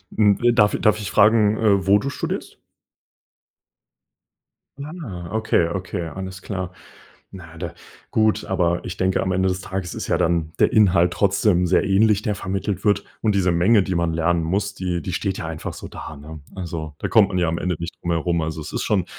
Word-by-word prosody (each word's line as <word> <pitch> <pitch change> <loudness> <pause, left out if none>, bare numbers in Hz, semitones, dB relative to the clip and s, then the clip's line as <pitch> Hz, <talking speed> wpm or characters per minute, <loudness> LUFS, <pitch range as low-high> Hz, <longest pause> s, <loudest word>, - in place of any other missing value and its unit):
Hm, 105 -2 +4
w 120 0 +4
darf 105 -3 +3
darf 110 0 +3
ich 100 - -5
fragen, 105 0 +4
äh, 100 -3 +2
wo 100 +1 +6
du 140 - -3
studierst? - - -5 2.3
Ah. 120 - -7
okay, 110 -6 +1
okay. 90 -1 -4
Alles 95 0 -7
klar. 95 -2 -4 0.6
Na, 85 -3 -11
da 85 -1 -5 0.4
gut. 110 -1 +2
Aber 85 -2 0
ich 90 - -6
denke, 95 0 +1
am 95 - -1
Ende 95 +1 +1
des 90 0 -2
Tages 95 -2 -5
ist - - -5
ja - - +1
dann 80 -2 0
der - - +3
Inhalt 90 -4 +4
trotzdem 100 -1 +2
sehr 95 - +3
ähnlich, 105 +1 +3
der 105 -2 -1
vermittelt 100 +1 -3
wird. 100 -1 +2 0.2
Und 105 -2 +1
diese 90 -2 +2
Menge, 95 +4 +4
die 95 - -2
man 85 -1 0
lernen 85 +1 +1
muss, 100 +5 -1
die 90 -2 -2
die 90 - -5
steht 95 0 -2
ja 80 - -4
einfach 80 -1 -6
so - - -8
da, 75 - -9
ne? 75 +2 -10 0.2
Also, 80 -4 -5
da - - -3
kommt 110 -4 +5
man 95 - -2
ja 85 - +2
am 85 +1 -1
Ende 90 -1 -1
nicht 85 +1 -6
drum 85 - -2
herum. 85 +1 0
Also, 80 0 -4
es 75 - -8
ist - - -2
schon - - +1
95 Hz, 205 wpm, -22 LUFS, 85-100 Hz, 2.3 s, wo